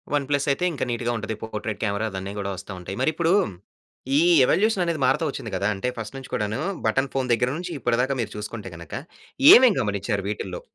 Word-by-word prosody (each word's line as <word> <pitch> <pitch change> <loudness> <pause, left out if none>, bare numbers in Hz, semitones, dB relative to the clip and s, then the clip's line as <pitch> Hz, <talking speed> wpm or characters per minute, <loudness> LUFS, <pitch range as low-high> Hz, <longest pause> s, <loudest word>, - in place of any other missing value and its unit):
One 145 - 0
plus 140 0 +1
అయితే 140 - -1
ఇంకా 140 - -3
నీట్‌గా 120 0 -1
ఉంటది. 110 0 -4
పోర్ట్రైట్ 110 -1 -5
కెమెరా 100 +1 0
అదన్నీ 95 +1 -5
గూడా 100 0 -3
వస్తా 100 +2 -9
ఉంటాయి. 95 +2 -6
మరి 155 - +3
ఇప్పుడు, 170 +2 +2 0.9
ఈ - - +5 0.2
ఎవల్యూషన్ 200 - +2
అనేది 165 -3 -1
మారుతా 140 +5 +2
ఒచ్చింది 110 - -7
గదా! 100 +3 0
అంటే 95 +6 -3
ఫస్ట్ 110 +3 -6
నుంచి 135 - -10
కూడాను 105 +6 -1 0.3
బటన్ 135 +4 +1
ఫోన్ 130 -2 -1
దగ్గర 125 +2 +1
నుంచి 180 0 -5
ఇప్పటి 120 0 +1
దాక 135 +2 0
మీరు 105 -2 -4
చూసుకుంటే, 105 -1 -6
గనక 85 - -9 0.6
ఏమేం 245 -5 +7
గమనించారు 100 -1 -2
వీటిల్లో? 95 -4 -5
115 Hz, 200 wpm, -24 LUFS, 100-140 Hz, 0.9 s, ఏమేం